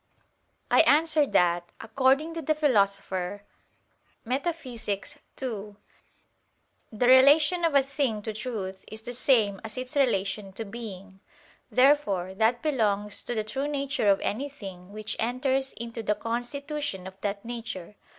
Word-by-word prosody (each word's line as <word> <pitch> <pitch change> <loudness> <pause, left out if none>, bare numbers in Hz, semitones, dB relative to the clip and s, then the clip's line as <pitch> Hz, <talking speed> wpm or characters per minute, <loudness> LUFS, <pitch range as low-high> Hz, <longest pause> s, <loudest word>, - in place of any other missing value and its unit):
I - - +6
answer 310 -1 +4
that, 175 -3 +2
According 270 +7 +2
to 330 - -4
the 310 +1 +1
Philosopher 200 -8 0 0.8
(Metaph. 290 +7 -2
ii), 225 -1 -6 1.2
"The 245 +3 +2
relation 295 +7 +6
of 325 -3 +2
a 275 - +6
thing 265 -6 -1
to 220 - -4
truth 210 -5 -5
is 220 0 -8
the 245 +2 -7
same 225 -6 +2
as 225 +2 -7
its 255 +3 -5
relation 195 -7 0
to 225 - -5
being." 200 -3 -9 0.5
Therefore 250 -9 +3
that 225 +4 +1
belongs 210 -8 0
to 240 - -3
the 215 - 0
true 265 +6 -3
nature 280 -6 0
of 195 - +4
any 270 +8 -2
thing 195 -8 -10
which 215 +1 -5
enters 265 +3 0
into 230 0 -6
the 210 -1 0
constitution 245 -1 -4
of 190 +1 -10
that 200 +1 -3
nature. 225 -6 -6
230 Hz, 140 wpm, -27 LUFS, 200-275 Hz, 1.2 s, I